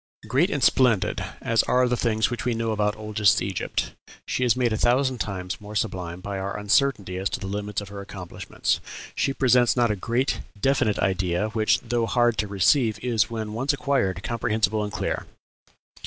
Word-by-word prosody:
"Great 150 +9 +2
and 145 -9 -1
splendid 125 -8 +3 0.2
as 115 -1 +2
are 125 0 +3
the 125 - +1
things 110 -2 +1
which 120 - -3
we 120 -1 0
know 115 0 -1
about 105 -1 0
oldest 105 -1 +2
Egypt, 95 -1 -2 0.3
she 125 - -1
is 120 -3 +3
made 125 -3 +1
a - - 0
thousand 130 +2 +2
times 95 -3 -4
more 105 +1 -9
sublime 90 -5 -3
by 100 0 -4
our 100 +1 -3
uncertainty 105 -3 +1
as 95 +1 -1
to - - -3
the - - -6
limits 105 +1 -3
of 100 - -9
her 100 0 -7
accomplishments. 95 -3 -3 0.3
She - - 0
presents 125 -4 +3
not 120 -2 +3
a - - 0
great, 120 +7 -1 0.2
definite 130 -3 +2
idea, 95 +1 0
which, 110 -1 +2
though 120 -1 -1
hard 120 -2 +2
to 105 - 0
receive, 110 +4 +2
is, 115 -3 +1
when 110 -2 -4
once 130 +6 0
acquired, 125 - 0
comprehensible 110 -2 0
and 105 - -4
clear. 105 - -3
110 Hz, 185 wpm, -25 LUFS, 100-120 Hz, 0.3 s, splendid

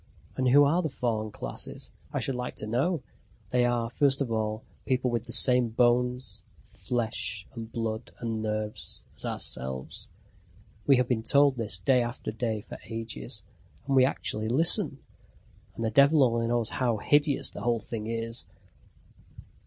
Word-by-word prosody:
And 130 - 0
who 145 +3 +7
are 160 +6 +3
the 160 - -2
fallen 115 -5 -2
classes, 60 -11 -7 0.2
I - - -1
should 135 - -1
like 125 0 -4
to - - -4
know? 130 +8 0 0.5
They 125 -1 +3
are, 120 -1 0
first 135 +1 +2
of 135 -5 -1
all, 110 -1 -2 0.2
people 130 -1 +1
with 120 -2 -2
the - - -8
same 125 -2 +5
bones, 120 -2 +1 0.3
flesh, 105 -1 -2
and 115 -1 -8
blood 115 0 -4
and 115 -2 -3
nerves 110 0 -4
as - - -10
ourselves. 65 0 -3 0.8
We 140 - +7
have 125 -1 +2
been 120 -3 0
told 140 +3 +4
this 110 -5 -1
day 125 +8 +3
after 120 0 -4
day 110 -1 -2
for - - -10
ages. 115 - -6 0.4
And 135 0 0
we 130 - +7
actually 110 -4 -1
listen 160 - +4 0.8
and 115 - -3
the 110 - 0
devil 140 +4 +6
only 115 -2 +1
knows 120 -1 0
how 120 -4 0
hideous 145 +6 +2
the - - -8
whole 120 +1 +1
thing 110 0 -6
is. 115 0 -3
120 Hz, 160 wpm, -28 LUFS, 110-130 Hz, 0.8 s, who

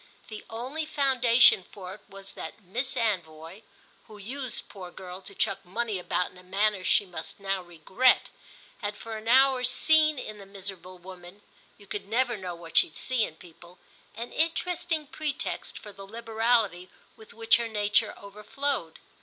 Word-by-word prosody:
The 215 -1 -7
only 255 +8 -4
foundation 260 -8 +5
for 185 -3 -8
it 210 - -13
was 195 0 -11
that 225 - -8
Miss 245 +9 -3
Anvoy, 170 -4 -2 0.5
who 215 - -12
used, 255 +4 -3
poor 185 -3 -9
girl, 180 +1 -9
to 200 +1 -11
chuck 195 - 0
money 215 +2 -2
about 180 0 -1
in 180 - -16
a - - -15
manner 195 +1 +1
she 200 - +4
must 175 -1 -8
now 195 -1 -1
regret, 175 +9 +2 0.5
had 205 -1 -4
for 225 -1 -7
an 215 +1 -8
hour 260 +1 +5
seen 310 +4 +4
in 215 -4 -6
the 195 - -11
miserable 190 -2 -7
woman—you 185 +3 -14
could 200 0 -4
never 240 +2 +1
know 185 -4 -5
what 170 -1 -5
she'd 155 - +4
see 255 -3 +2
in 155 - -10
people—an 175 +7 -12
interesting 335 -1 0
pretext 295 0 -3
for 210 - -10
the 195 0 -11
liberality 225 -4 +1 0.3
with 220 - -13
which 230 0 +5
her 235 -1 -2
nature 210 0 +1
overflowed. 210 - -3
210 Hz, 160 wpm, -28 LUFS, 185-245 Hz, 0.5 s, foundation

